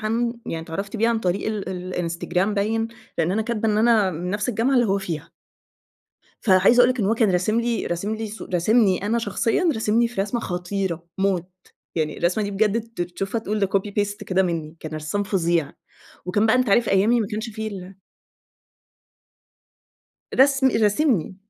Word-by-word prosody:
عنه 230 +2 0
يعني 165 0 -4
اتعرفت 195 +6 -5
بيه 225 +2 +2
عن 230 -1 +1
طريق 185 -2 -1
ال 210 -4 -3
ال 180 -1 -5
الإنستجرام 180 +3 -1
باين؛ 225 +3 0 0.3
لأن 165 +2 +1
أنا 220 +3 +1
كاتبة 225 -1 -1
إن 210 0 +2
أنا 220 -4 +4
من 175 +2 -4
نفس 210 +3 -2
الجامعة 245 +3 +1
اللي 245 -2 +4
هو 195 0 +1
فيها. 165 -5 -5 1.1
فعايزة 195 +4 +5
أقول 245 +1 +6
لَك 255 - -3
إن 200 - +1
هو 220 - +2
كان 225 -3 +2
راسم 190 +6 +1
لي 235 -1 -1
راسم 195 +5 -2
لي 220 0 -4
صو 215 +1 -8
راسمني 195 +1 +3
أنا 230 +3 +1
شخصيًا، 235 +8 +1
راسمني 220 +1 +2
في 235 -4 -3
رسمة 210 +4 -1
خطيرة 180 -2 -3
موت، 190 -3 0 0.5
يعني 155 -2 -2
الرسمة 180 +5 +1
دي 200 - -3
بجد 210 +2 +1 0.2
ت 175 - 0
تشوفها 190 +5 -3
تقول 215 -1 -3
ده 195 - +3
copy 195 +1 -1
paste 205 0 -1
كده 190 -1 +2
منّي، 165 -3 -3
كان 155 - -7
رسّام 155 +6 -2
فظيع، 170 -6 0 0.5
وكان 205 +4 +2
بقى 220 - +4
أنت 255 -2 +1
عارف 230 +4 +3
أيامي 215 +5 +3
ما 215 - -1
كانش 220 +2 -4
في 220 0 -5
ال 190 -2 -8 2.4
رسم 270 0 +5
راسمني. 210 - +1
205 Hz, 185 wpm, -23 LUFS, 180-225 Hz, 2.4 s, أقول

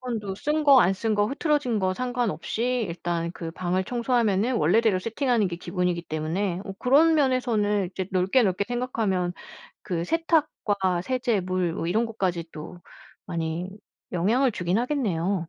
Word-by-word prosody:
수건도 220 -6 -4
쓴 300 +5 0
거, 275 -3 +8
안 185 -1 +4
쓴 215 +3 -1
거, 205 0 +3
흐트러진 280 -5 0
거 185 -1 +1
상관없이 245 0 -1
일단 170 0 -3
그 165 -2 -6
방을 180 +2 -1
청소하면은 235 -2 +1
원래대로 200 +4 +3
세팅하는 230 -1 0
게 170 - -5
기본이기 180 -1 -2
때문에 170 +4 -2
어 195 - -6
그런 300 +6 +4
면에서는 230 -8 +1
이제 190 -1 -4
넓게 190 +7 +3
넓게 195 0 0
생각하면 225 -8 -1 0.5
그 170 -4 -2
세탁과 210 - 0
세제, 245 -2 0
물 185 -2 -1
뭐 165 - -3
이런 225 +6 +1
것까지 185 -6 -2
또 155 +3 -9 0.5
많이 170 +1 -3 0.4
영향을 230 +9 +2
주긴 180 +1 0
하겠네요. 200 - -1
205 Hz, 330 characters per minute, -25 LUFS, 180-245 Hz, 0.5 s, 거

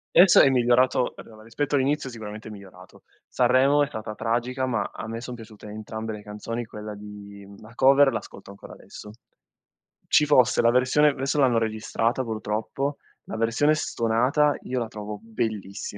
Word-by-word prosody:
Adesso 175 +1 +8
è 135 - +6
migliorato 125 0 +2
adora, 110 -1 -13
rispetto 145 +6 -4
all'inizio 135 0 0
sicuramente 110 -2 -9
è 110 - -8
migliorato. 95 -3 -14 0.3
Sanremo 130 +4 +3
è 145 - -1
stata 110 -5 -6
tragica, 125 +3 -1
ma 115 -5 -1
a 110 - -7
me 115 +1 -5
son 125 0 -7
piaciute 110 -2 -13
entrambe 110 +1 -6
le 105 -1 -9
canzoni; 115 +3 -6
quella 105 -1 -8
di, 100 -1 -11
mhmm, 100 0 -15
la 110 +2 -14
cover 135 +2 +5
l'ascolto 100 -4 -8
ancora 100 0 -12
adesso. 105 - -12 1.0
Ci 150 - +4
fosse 130 -5 +4
la 115 - +4
versione 135 +4 +3
v 130 - -9
esso 140 +2 0
l'hanno 125 -4 +3
registrata 115 +3 -1
purtroppo, 110 +5 -3 0.3
la 110 - -6
versione 115 +7 +2
stonata 135 +2 +1
io 125 0 -3
la 115 - -3
trovo 105 -1 -7
bellissima. 110 -3 -5
115 Hz, 170 wpm, -25 LUFS, 105-130 Hz, 1.0 s, Adesso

